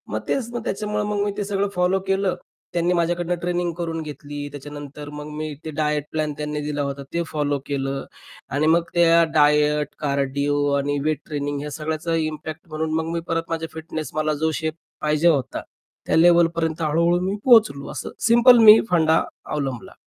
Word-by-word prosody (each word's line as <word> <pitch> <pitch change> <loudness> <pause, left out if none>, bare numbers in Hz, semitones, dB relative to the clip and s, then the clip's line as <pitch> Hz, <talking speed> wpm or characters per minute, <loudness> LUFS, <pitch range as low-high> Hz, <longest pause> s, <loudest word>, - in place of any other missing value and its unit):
मग - - -2
तेच 245 -4 -1
मग 240 -2 -4
त्याच्यामुळं 210 -1 -2
मग 205 -1 -1
मी 205 - -1
ते 210 - -1
सगळं 200 0 -1
फॉलो 180 +2 +2
केलं. 195 -1 +1 0.4
त्यांनी 175 +1 +1
माझ्याकडनं 175 0 0
ट्रेनिंग 175 0 -1
करून 165 -2 -3
घेतली. 145 -1 -7
त्याच्यानंतर 145 +1 -8
मग 150 0 -7
मी 155 -1 -4
ते 155 - -4
डायट 150 -1 +1
प्लॅन 155 -1 -1
त्यांनी 150 0 -3
दिला 145 -1 -2
होता. 140 0 -3
ते 170 0 0
फॉलो 145 -2 -1
केलं 135 -1 -3 0.4
आणि 145 +4 +1
मग 165 +1 +4
त्या 170 -1 +5
डायट, 150 -1 +3
कार्डिओ 140 0 0
आणि 145 +1 -1
वेट 155 -1 0
ट्रेनिंग 145 -2 -3
ह्या 150 +1 -5
सगळ्याचा 160 +2 -2
इम्पॅक्ट 155 0 -4
म्हणून 155 0 -2
मग 160 0 -1
मी 170 - -1
परत 165 - 0
माझ्या 165 0 -2
फिटनेस, 160 -1 -6
मला 155 0 0
जो 160 +2 0
शेप 160 0 -1 0.3
पाहिजे 155 +2 +2
होता. 140 -7 +1 0.4
त्या - - +1
लेव्हलपर्यंत 165 -1 +3
हळू-हळू 170 +3 +2
मी 195 +2 -1
पोहोचलो 220 - +5
असं - - -5 0.2
सिंपल 235 +2 +7
मी 215 0 +10
फंडा 160 -2 +3 0.2
अवलंबला. 135 -5 -4
155 Hz, 175 wpm, -22 LUFS, 150-175 Hz, 0.4 s, मी